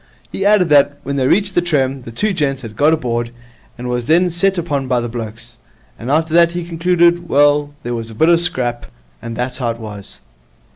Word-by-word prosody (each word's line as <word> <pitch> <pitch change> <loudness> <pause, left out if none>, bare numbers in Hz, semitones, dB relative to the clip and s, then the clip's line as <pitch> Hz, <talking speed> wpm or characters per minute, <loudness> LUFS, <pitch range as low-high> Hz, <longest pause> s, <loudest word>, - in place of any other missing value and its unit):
He 195 - -1
added 205 -5 +3
that, 145 -1 +4
when 140 +1 -3
they 130 -1 +1
reached 200 +5 +2
the 175 - +2
trem, 135 -6 -1
the 115 - -8
two 205 - -1
gents 140 -5 -1
had 110 -2 -9
got 150 +7 +3
aboard, 120 -6 -1 0.5
and 125 +1 -6
was 125 -1 -3
then 175 +3 +3
set 190 +3 +1
upon 145 -6 -2
by 125 -1 +1
the 120 - -3
blokes. 115 0 -8 0.4
And 120 - -6
after 160 +2 +1
that, 170 0 +4
he 175 -1 -4
concluded, 175 0 +1
well, 145 0 +2
there 120 - -3
was 115 -1 -4
a 110 - -10
bit 160 +9 +3
of - - +6
a - - +5
scrap, 125 -9 0 0.3
and 115 -1 -6
that's 125 +2 -3
how 120 -3 -1
it 115 0 -4
was. 105 -3 -8
140 Hz, 225 wpm, -17 LUFS, 120-170 Hz, 0.5 s, of